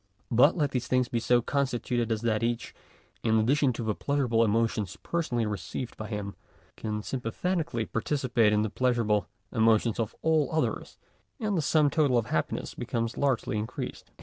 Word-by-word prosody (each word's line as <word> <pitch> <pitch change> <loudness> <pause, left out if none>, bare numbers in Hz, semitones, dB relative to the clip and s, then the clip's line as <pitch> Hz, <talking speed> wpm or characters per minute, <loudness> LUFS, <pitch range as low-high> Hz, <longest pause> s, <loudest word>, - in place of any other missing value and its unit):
But 130 +9 +5
let 145 -4 +1
these 125 -1 -2
beings 125 -1 +2
be 120 - 0
so 120 +1 +3
constituted 120 -4 -1
as 110 -1 0
that 110 -2 +1
each, 115 0 -2 0.5
in 110 -1 +2
addition 130 +5 +3
to 115 - -4
the 110 -1 0
pleasurable 125 -3 +1
emotions 110 -3 0
personally 130 -9 -1
re 105 -2 -2
ceived 95 +6 -6
by 110 - -6
him, 105 -2 -4 0.4
can 105 -1 -4
sympathetically) 130 - -2
participate 120 -2 +1
in 105 0 +2
the 110 - -2
pleasurable 115 -5 +1 0.2
emotions 115 0 +3
of 110 -3 -2
all 160 -4 +3
others, 155 -1 -1 0.4
and 215 -4 -1
the 165 - +2
sum 150 -1 +3
total 145 -5 +3
of 115 - +1
happiness - - -2
becomes 115 0 -3
largely 130 -6 0
increased. 110 +2 -6
120 Hz, 170 wpm, -28 LUFS, 110-140 Hz, 0.5 s, But